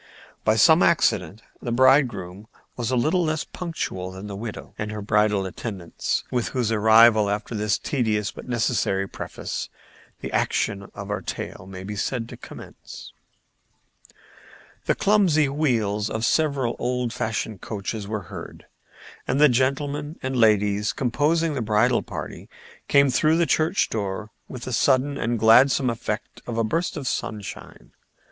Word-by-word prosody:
By 110 - +3
some 160 - +6
accident 105 - +2 0.2
the 120 - -4
bridegroom 120 -7 +2 0.3
was 120 -2 -3
a 130 - +1
little 155 +9 +2
less 155 -1 -1
punctual 155 - -5
than 95 +2 -9
the 100 -1 -6
widow 110 +1 -7
and 105 0 -3
her 105 - -5
bridal 105 -1 +2
attendants, 95 -2 -4
with 120 -2 0
whose 125 -4 -1
arrival, 110 0 +6
after 105 +3 -3
this 105 -2 0
tedious 110 -6 -1
but - - -11
necessary 110 -5 0
preface, - - -6 0.5
the - - -5
action 100 -1 -1
of 100 0 -6
our 105 - -2
tale 95 - -6
may 95 -1 -8
be 105 +2 -6
said 115 +3 -2
to - - -8
commence. - - -11 1.7
The - - +3
clumsy 185 -8 +3
wheels 115 -8 0
of 110 +1 -2
several 140 -6 +1
old 125 -1 -1
fashioned 110 -3 -3
coaches 105 0 -5
were 105 -2 -3
heard, - - -10 0.6
and 140 - 0
the 150 0 +7
gentlemen 140 +4 -1
and 130 0 -2
ladies 105 -2 +3
composing 150 +6 +1
the 135 - -2
bridal 110 +3 +2
party - - -8 0.4
came 140 -1 +4
through 155 +5 +3
the 170 - +3
church 165 +4 +2
door 105 0 -3 0.2
with 125 -2 -8
the 130 - -5
sudden 135 +3 +2
and 120 +1 0
gladsome 125 +3 +5
effect 115 -1 -5
of 120 -2 -4
a 115 - +2
burst 165 +10 -1
of 140 -3 -4
sunshine. 105 -4 -5
115 Hz, 150 wpm, -24 LUFS, 105-135 Hz, 1.7 s, the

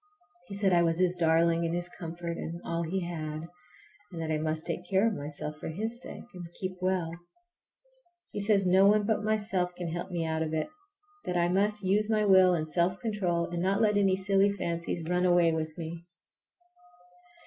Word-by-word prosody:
He 200 - -6
said 195 -2 +2
I 170 - +5
was 165 -1 +1
his 180 0 +3
darling 165 0 +3
and 165 0 -1
his 175 0 -1
comfort 170 -1 -6
and 170 0 -5
all 170 0 -2
he 180 +3 -2
had, 155 -3 -4 0.7
and 170 - -7
that 160 -1 -3
I 155 - 0
must 155 0 -2
take 175 +1 -4
care 195 +2 +3
of 225 - +2
myself 150 -1 -5
for - - -6
his 220 +9 -3
sake, - - -8
and 175 -2 -9
keep 185 -1 -2
well. 185 -3 0 1.2
He - - -4
says 200 -1 +2
no 190 +2 +5
one 210 +1 +4
but 220 0 +1
myself 205 -5 +1
can 175 -1 -4
help 175 +3 -4
me 170 -3 -2
out 160 0 -1
of 160 0 -2
it, 155 - -1 0.6
that 180 - -1
I 175 0 +2
must 205 +3 +1
use 205 +3 +1
my 215 -1 +2
will 190 -2 +6
and 155 -2 -2
self 170 +4 +1
control 190 -8 -1
and 170 0 -2
not 195 +2 +1
let 210 -2 +3
any 195 -2 +3
silly 195 +1 +2
fancies 170 -3 -3
run 180 +1 +1
away 175 -2 +4
with 155 0 -3
me. 165 0 -6
175 Hz, 200 wpm, -29 LUFS, 165-195 Hz, 1.2 s, will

